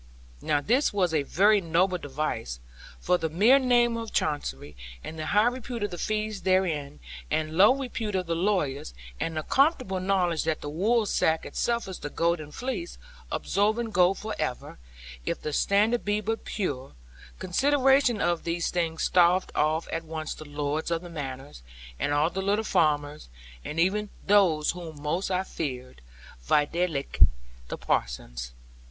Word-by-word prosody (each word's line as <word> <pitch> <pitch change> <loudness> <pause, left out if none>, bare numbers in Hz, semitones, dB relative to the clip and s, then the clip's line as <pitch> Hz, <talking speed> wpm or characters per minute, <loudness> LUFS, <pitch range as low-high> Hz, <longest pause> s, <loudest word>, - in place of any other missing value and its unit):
Now 145 -1 +1
this 250 - +2
was 185 -5 +1
a 155 - +3
very 205 +8 +3
noble 180 +2 +1
device, 135 - -4 0.4
for 180 0 +1
the 160 - -1
mere 215 - +5
name 240 -2 +3
of 225 -1 -6
Chancery, 75 - -2 0.3
and 160 - -7
the 155 - -4
high 210 +6 +4
repute 245 -2 -2
of 205 - -2
the 175 - -6
fees 215 -2 -2
therein, 170 -6 0 0.3
and 155 0 -1
low 205 +9 +6
repute 235 -6 -4
of 185 -1 0
the 165 - -1
lawyers, 165 - -1 0.2
and 160 -1 -2
the 155 - -1
comfortable 260 - +2
knowledge 185 -3 +1
that 160 -1 -1
the 145 - -5
woolsack 195 -3 +1
itself 235 -2 -1
is 190 - -7
the 145 - -5
golden 165 -1 -1
fleece, 265 - -5 0.3
absorbing 220 +3 0
gold 185 0 +3
for 215 0 -5
ever, 130 - -4 0.4
if - - -2
the 150 - -4
standard 215 +8 +2
be 205 0 0
but 225 +2 -3
pure; 140 -11 -3 0.4
consideration 270 +4 +3
of 175 -3 0
these 170 0 -1
things 165 -2 -1
staved 180 +1 +3
off 155 +2 +1
at 165 +1 -2
once 160 -1 -5
the 155 - -10
lords 145 +2 -3
of 170 0 -1
the 175 - -9
manors, 135 - -7 0.4
and 145 - 0
all 150 +3 +2
the 190 - -3
little 205 +3 +1
farmers, 150 - 0 0.3
and 160 - -4
even 205 +4 +1 0.2
those 185 -7 +4
whom 165 -4 -9
most 155 +6 -2
I 185 0 0
feared; 130 - -6 0.5
videlicet, 150 -1 +2 0.4
the - - -5
parsons. - - -2
175 Hz, 160 wpm, -27 LUFS, 150-210 Hz, 0.5 s, low